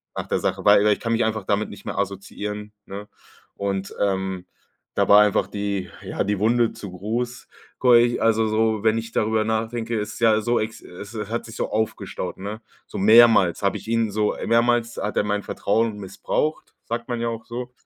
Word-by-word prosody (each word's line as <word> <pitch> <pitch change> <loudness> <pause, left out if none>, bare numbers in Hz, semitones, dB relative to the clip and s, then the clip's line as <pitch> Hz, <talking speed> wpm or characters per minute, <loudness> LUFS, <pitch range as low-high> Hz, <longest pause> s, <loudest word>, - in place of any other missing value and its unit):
Nach - - -4
der - - 0
Sache, - - -2
weil 105 0 +6
i 105 - +5
ich 105 - +1
kann 115 -1 -1
mich 115 +1 +2
einfach 110 -3 -2
damit 105 +2 0
nicht 100 - -12
mehr - - -5
assoziieren, 105 +2 -4
ne? 100 +1 -8 0.5
Und, 100 -1 -3
ähm, 95 -2 -1 0.5
da - - +2
war 105 +1 +8
einfach 105 -1 +2
die, 100 -2 -3
ja, - - -3
die 100 -1 -1
Wunde 115 +2 +2
zu 100 - -8
groß, 115 +7 -4 0.3
ko 125 -1 +5
ich 120 +1 +3
also 110 0 +3
so, 110 0 +1
wenn 110 0 +3
ich 115 0 -5
darüber 110 0 +1
nachdenke, 115 +1 -2
es 105 0 -4
ist - - -9
ja 110 -2 +4
so, 120 +3 +1
es, 110 +1 -4
äh, 105 +4 -7
hat 115 +2 -3
sich 115 - -10
so - - -2
aufgestaut, 110 0 -3
ne? 105 +4 -6 0.3
So - - -7
mehrmals 110 -3 +6
habe 100 - +1
ich - - -12
ihn 115 -2 +1
so 105 +1 0
äh, - - -6
mehrmals 120 0 +2
hat 105 - -3
er - - +3
mein 105 0 -1
Vertrauen 110 +1 0
missbraucht, 100 +10 -3
sagt 120 0 -4
man 120 -2 -3
ja 120 - 0
auch 115 -1 -6
so. 125 +1 -6
110 Hz, 210 wpm, -23 LUFS, 100-115 Hz, 0.5 s, war